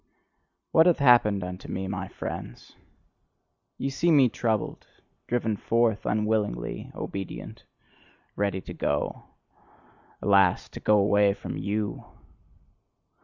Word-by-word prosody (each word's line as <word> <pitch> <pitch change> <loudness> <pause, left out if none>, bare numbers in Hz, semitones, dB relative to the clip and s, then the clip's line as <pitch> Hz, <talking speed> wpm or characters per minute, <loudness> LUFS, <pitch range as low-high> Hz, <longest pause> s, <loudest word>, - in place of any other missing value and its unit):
What 160 +2 +6
hath 175 - +4
happened 120 -7 +4
unto 90 +1 -7
me, 95 0 -4
my 95 -1 -4
friends? - - -8 1.0
Ye 135 - -2
see 165 +5 +1
me 140 -6 +6
troubled, 110 -3 -2 0.4
driven 115 -3 0
forth, 115 +1 +1
unwillingly 105 - -1
obedient, 95 -1 -7 0.7
ready 100 -2 -1
to - - -9
go 75 0 -2 0.9
alas, 95 -3 +3
to - - -9
go 105 - +3
away 100 0 +3
from - - -6
YOU! 105 +1 -3
105 Hz, 110 wpm, -26 LUFS, 95-115 Hz, 1.0 s, What